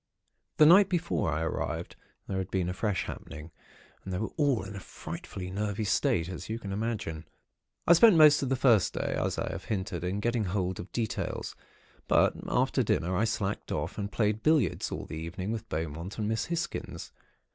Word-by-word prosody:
"The 155 - +8
night 190 +5 +7
before 170 - 0
I 80 +2 -1
arrived, 80 - -3 0.3
there 95 - -2
had 95 - -4
been 90 -2 0
a - - -2
fresh 95 -2 -1
happening, 80 +1 -8 0.5
and 95 - -6
they 90 - -1
were 110 +3 -3
all 140 -8 +2
in 95 +1 -8
a - - -5
frightfully 90 0 -7
nervy 105 +2 -2
state, 105 - +1
as 95 +2 -7
you 110 - -2
can 100 -4 -7
imagine. 100 -8 -3 0.6
"I 170 - +7
spent 210 +3 +7
most 150 -2 +7
of 135 - -1
the 135 - +2
first 120 -6 +3
day, - - -1
as - - -1
I - - -2
have - - -6
hinted, 95 -5 -3
in 90 +3 -1
getting 120 0 0
hold 95 -1 -1
of 90 - -8
details; 110 -1 -3 0.5
but - - +4
after - - +2
dinner, 90 +3 0
I 105 +5 +2
slacked 105 -2 -2
off, 75 +8 -3
and 100 0 -3
played 105 0 0
billiards 155 - +2
all - - -4
the 80 - -7
evening 90 +5 -4
with 115 0 -5
Beaumont 80 +4 -4
and 105 -2 -1
Miss 110 +1 0
Hisgins. 170 0 -4
105 Hz, 195 wpm, -29 LUFS, 90-120 Hz, 0.6 s, The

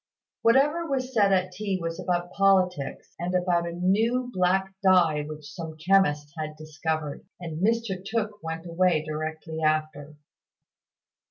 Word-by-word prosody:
Whatever 290 +8 +3
was 260 -1 -2
said 205 -4 +4
at 185 -1 +2
tea 195 0 -2
was 165 0 -4
about 175 -1 -1
politics, 185 -7 +1
and 175 +2 -2
about 175 -1 +1
a - - -4
new 220 +8 +1
black 190 +1 +1
dye 175 -6 +4
which 150 0 -8
some 160 -3 -7
chemist 155 -4 +2
had 155 -1 -5
discovered; 155 -1 -4 0.2
and 165 -1 -5
Mr 220 -4 0
Tooke 210 0 -3
went 165 +1 -5
away 170 -2 +2
directly 155 +1 -4
after. 155 -1 -1
180 Hz, 140 wpm, -26 LUFS, 155-195 Hz, 0.2 s, said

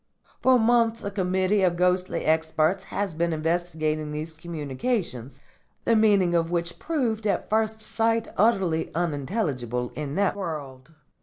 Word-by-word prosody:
For 260 -1 +5
months 230 0 +2
a 200 - -3
committee 190 +1 +1
of 180 -2 +3
ghostly 180 +1 +1
experts 160 +4 +1
has 195 -2 -3
been 170 +2 0
investigating 155 -1 -1
these 155 +2 -4
communications, 150 - -4 0.5
the 230 - +4
meaning 200 -5 +4
of 165 -1 +2
which 170 0 -2
proved 235 -9 -1
at 200 - -1
first 220 0 +1
sight 225 +1 0
utterly 190 -6 +2
unintelligible 140 - -2
in 150 -1 -5
that 200 -1 +1
world. 155 -6 -6
175 Hz, 135 wpm, -25 LUFS, 155-210 Hz, 0.5 s, For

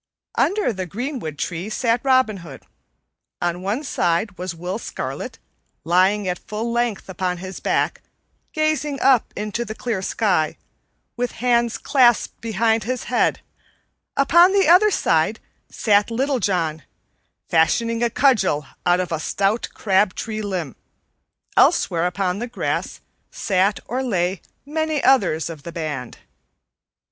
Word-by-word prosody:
Under 400 - +1
the 185 -2 -4
greenwood 225 - -5
tree 175 +6 -3
sat 235 +1 0
Robin 260 -6 +3
Hood; 165 -7 -11 0.8
on 175 0 -1
one 210 +9 -2
side 185 - 0
was 180 -1 -5
Will 180 +5 -4
Scarlet, - - -5 0.5
lying 185 +4 +2
at 180 -1 -2
full 220 +2 -4
length 235 -3 -1
upon 180 -1 -2
his 185 +1 -7
back, - - 0 0.5
gazing 305 -2 0
up 265 -4 +3
into 210 +3 -3
the 215 -1 -7
clear 230 -6 -3
sky, 185 -6 0 0.6
with 245 0 -2
hands 235 -1 +1
clasped 245 -5 +2
behind 225 0 +1
his 255 +2 -3
head; - - +2 0.8
upon 340 +7 +6
the 395 -1 +3
other 365 +5 +7
side 165 - +1 0.3
sat 205 -1 +2
Little 265 +3 0
John, 165 -6 0 0.7
fashioning 230 +8 +2
a 235 - +2
cudgel 210 - +2 0.2
out 175 0 +4
of 180 -1 -2
a 160 - -1
stout 200 +7 0
crab 195 -1 +2
tree 215 -1 -4
limb; 180 - -4 0.8
elsewhere 170 +1 +3
upon 180 +1 -1
the 240 - -3
grass 240 - -3 0.3
sat 195 +1 +1
or 250 +3 -2
lay 185 -7 -1 0.2
many 310 0 -1
others 190 - +3
of 165 -3 -8
the 170 - -8
band. 150 -7 -5
210 Hz, 135 wpm, -22 LUFS, 180-245 Hz, 0.8 s, other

